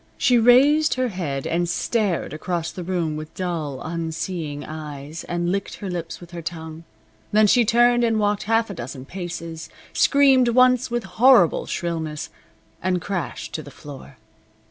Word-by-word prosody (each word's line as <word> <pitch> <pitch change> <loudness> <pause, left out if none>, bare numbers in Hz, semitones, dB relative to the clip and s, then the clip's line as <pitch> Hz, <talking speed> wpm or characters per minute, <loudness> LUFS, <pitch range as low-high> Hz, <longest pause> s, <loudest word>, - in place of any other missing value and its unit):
She 245 -1 +4
raised 280 +7 +5
her 255 -1 0
head 150 -9 -4
and 170 +1 0
stared 200 -3 -1
across 170 +1 -3
the 180 - -7
room 170 -3 -1
with 155 0 -8
dull, 160 -7 -3
unseeing 160 -2 -4
eyes, 150 0 -7
and 175 0 -1
licked 195 0 -3
her 195 -2 -6
lips 170 -2 -5
with 175 -1 -13
her 175 -1 -6
tongue. 160 -1 -7 0.5
Then 215 +1 +5
she 240 +4 +5
turned 240 +2 +4
and 225 -2 +2
walked 205 0 +1
half 225 -1 +2
a - - -5
dozen 130 -3 -7
paces, 170 -2 -6 0.2
screamed 270 -3 +4
once 255 +1 +4
with 240 -1 -2
horrible 215 -1 +4
shrillness, 160 -3 -4 0.5
and 185 0 0
crashed 185 0 -4
to 155 - -3
the 145 - -11
floor. 140 -2 -12
175 Hz, 160 wpm, -23 LUFS, 160-225 Hz, 0.5 s, raised